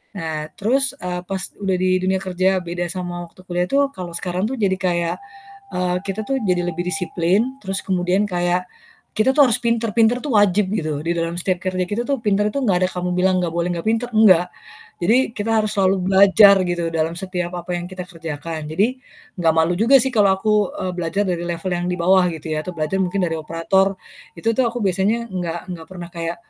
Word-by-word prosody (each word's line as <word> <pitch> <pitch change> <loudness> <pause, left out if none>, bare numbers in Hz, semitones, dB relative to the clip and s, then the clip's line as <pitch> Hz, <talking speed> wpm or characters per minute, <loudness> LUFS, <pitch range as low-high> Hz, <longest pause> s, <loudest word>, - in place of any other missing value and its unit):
Nah 160 -3 -4
terus, 270 +7 +2
eee, 180 0 -3
pas 190 -1 -3 0.2
udah 195 -2 0
di 185 0 0
dunia 190 0 +1
kerja 185 0 +1
beda 175 +1 -3
sama 175 0 -5
waktu 185 - -18
kuliah 180 0 0
tuh, 280 0 +2
kalau 175 -2 -7
sekarang 180 +2 -1
tuh 265 - -3
jadi 190 -2 +1
kayak, 175 -2 0 0.6
eee, 180 0 0
kita 200 +2 -3
tuh 270 -1 -1
jadi 180 -1 +1
lebih 175 +1 -3
disiplin, 195 +7 0
terus 195 0 -2
kemudian 185 +2 +1
kayak 175 -1 0 0.5
kita 220 +5 +4
tuh 285 -1 +6
harus 225 - +4
pinter 230 -1 0
pinter 230 +2 +4
tuh 280 -6 -2
wajib 200 -1 +3
gitu. 155 -6 -2
Di 170 +1 -1
dalam 165 0 -2
setiap 185 0 0
kerja 185 0 -1
kita 220 +3 -1
tuh, 280 -2 0
pinter 210 -1 +2
itu - - -2
enggak 185 -5 +2
ada - - -4
kamu 180 0 -3
bilang, 185 +1 +2
"Enggak 165 -2 -2
boleh, 170 +1 0
enggak 170 +1 -5
pinter," 230 +2 0
enggak. 185 -5 +6 0.6
Jadi, 230 +6 +3
kita 210 +2 -2
harus 215 - -1
selalu 190 0 +3
belajar 200 +1 +7
gitu, 175 -2 -1
dalam 165 0 -1
setiap 180 -1 -4
apa 175 0 -4
yang 175 - -4
kita 185 -1 -6
kerjakan. 160 -2 -6
Jadi, 205 +12 0 0.4
enggak 165 -2 +3
malu 160 +2 +3
juga 255 +5 +6
sih - - +1
kalau 205 -4 +4
aku, 210 0 +1
eee, 185 - -2
belajar 175 +3 -1
dari 175 -1 -2
level 175 +1 -3
yang 175 - -3
di 180 - -2
bawah 185 +1 +4
gitu 160 0 -7
ya, 155 - -3
atau 180 - -5
belajar 155 +5 -1
mungkin 190 +1 0
dari 165 -1 -1
operator, 165 +5 +1 0.4
itu 170 +7 -3
tuh 260 - +3
aku 245 - -5
biasanya 200 +5 0
enggak 175 -1 -4
enggak 165 -2 -7
pernah 175 -2 -8
kayak, 170 0 -4
185 Hz, 210 wpm, -20 LUFS, 175-205 Hz, 0.6 s, belajar